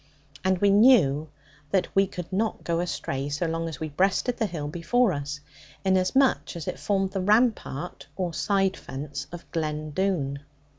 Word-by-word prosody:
And 190 0 +2
we 200 +2 +4
knew 195 - +5 0.4
that 190 +3 +2
we 195 0 +4
could 180 -1 -7
not 215 +3 -1
go 170 -1 0
astray, 140 -4 -2
so 150 +4 -1
long 165 0 -2
as 155 - -8
we 155 - -3
breasted 195 - +1
the 225 - +1
hill 155 -6 -4
before 180 +8 +2
us; 145 +1 -4 0.4
inasmuch 190 +7 +2
as 165 -2 -6
it - - -3
formed 195 -2 0
the 190 -1 -2
rampart, 210 - +1
or 180 -3 -2
side 190 +5 +1
fence 140 +2 -6
of 175 -1 -8
Glen 155 -2 -2
Doone. 145 -6 0
175 Hz, 165 wpm, -26 LUFS, 150-195 Hz, 0.4 s, knew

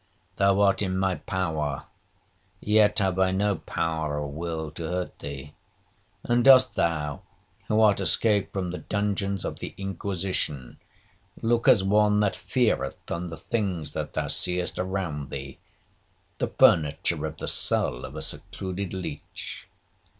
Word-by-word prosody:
Thou 100 0 +3
art 100 0 +3
in 95 -2 0
my 95 0 +1
power, 80 -7 -2 0.8
yet 105 0 +3
have 95 -3 +1
I 95 0 +4
no 100 +2 +1
power 80 -2 -2
or 75 - -3
will 80 0 -4
to 80 0 -5
hurt 90 +1 -3
thee. 70 0 -7 0.7
And 120 0 +2
dost 130 -1 +7
thou, 75 -4 -1 0.5
who 110 - +2
art 105 -3 +5
escaped 100 +3 +3
from 95 -3 -3
the 90 - -5
dungeons 100 -2 -1
of - - -4
the - - -6
Inquisition, 95 -8 -3 0.6
look 115 0 +2
as 100 - +6
one 105 +1 +3
that 105 -2 +1
feareth 110 - -1
on 85 +1 -3
the 80 - -7
things 95 -9 -2
that - - -3
thou - - -1
seest 90 0 0
around 90 -7 -3
thee, 70 -1 -7 0.8
the - - +1
furniture 75 -4 +3
of - - -8
the - - -5
cell - - +1
of - - -8
a - - -2
secluded 95 0 -4
leach? 95 - -7
95 Hz, 145 wpm, -26 LUFS, 80-100 Hz, 0.8 s, dost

